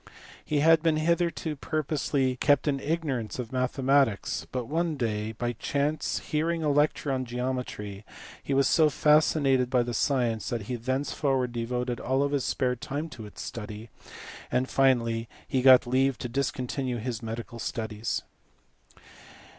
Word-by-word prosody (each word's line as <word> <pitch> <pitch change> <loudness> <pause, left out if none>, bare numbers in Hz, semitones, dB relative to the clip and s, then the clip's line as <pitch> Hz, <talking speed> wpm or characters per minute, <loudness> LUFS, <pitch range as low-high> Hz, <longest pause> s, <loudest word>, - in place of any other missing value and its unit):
He 150 -2 0
had 165 +1 +6
been 160 -1 +2
hitherto 170 -1 0
purposely 140 -3 -1
kept 145 +3 +3
in 140 -2 +1
ignorance 140 -7 -2
of 125 -3 -5
mathematics, 130 -3 +1
but 125 -2 -2
one 165 +4 -1
day, 110 -3 -2
by 120 +2 -2
chance 145 +5 -1
hearing 165 +2 -1
a 150 - +2
lecture 145 0 +1
on 130 -1 0
geometry, 120 -5 -4 0.4
he 140 - -2
was 135 -1 +4
so 155 -2 +4
fascinated 145 -4 +3
by 125 -2 +3
the 120 0 -4
science 120 -3 0
that 120 -3 -2
he 125 +5 -4
thenceforward 130 +1 -1
devoted 120 +1 -2
all 135 +3 +1
his 140 -2 -1
spare 125 -2 0
time 145 +6 -4
to 110 -7 -9
its - - -9
study, 110 0 -7 0.6
and 130 +1 +1
finally 115 -4 +2 0.2
he 130 - 0
got 130 -1 +7
leave 130 +1 +2
to 125 - -4
discontinue 130 0 -2
his 115 0 -4
medical 115 +1 -6
studies. 110 -1 -3
130 Hz, 145 wpm, -27 LUFS, 120-145 Hz, 0.6 s, got